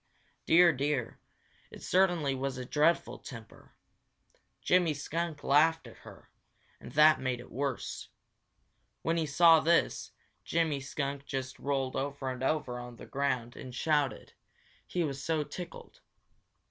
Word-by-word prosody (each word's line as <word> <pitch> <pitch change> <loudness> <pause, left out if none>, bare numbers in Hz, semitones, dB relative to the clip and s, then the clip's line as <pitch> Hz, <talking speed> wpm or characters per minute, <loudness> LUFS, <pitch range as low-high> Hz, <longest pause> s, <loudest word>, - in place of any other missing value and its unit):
Dear, 170 0 +6
dear, 140 -3 -2 0.5
it - - -12
certainly 175 -7 +2
was 135 0 -3
a 125 - -5
dreadful 155 +6 +1
temper! 115 -4 -12 0.8
Jimmy 175 -4 +2
Skunk 160 +1 -4
laughed 160 +3 +3
at - - -13
her, - - -15 0.5
and - - -11
that 155 +1 +6
made 130 -2 -2
it 120 - -12
worse. 135 -1 -4 0.9
When 165 +1 0
he 160 -2 0
saw 165 +3 +6
this, 170 +2 +1 0.3
Jimmy 160 -4 0
Skunk 140 0 -4
just 130 -1 -4
rolled 135 -2 -1
over 135 -1 -3
and 130 0 -7
over 130 -3 -1
on 120 0 -9
the - - -11
ground 130 -4 -2
and 125 -1 -9
shouted, 150 -1 0 0.5
he 175 - -1
was 140 -3 -4
so 160 -1 0
tickled. 170 +4 -9
145 Hz, 135 wpm, -30 LUFS, 130-160 Hz, 0.9 s, Dear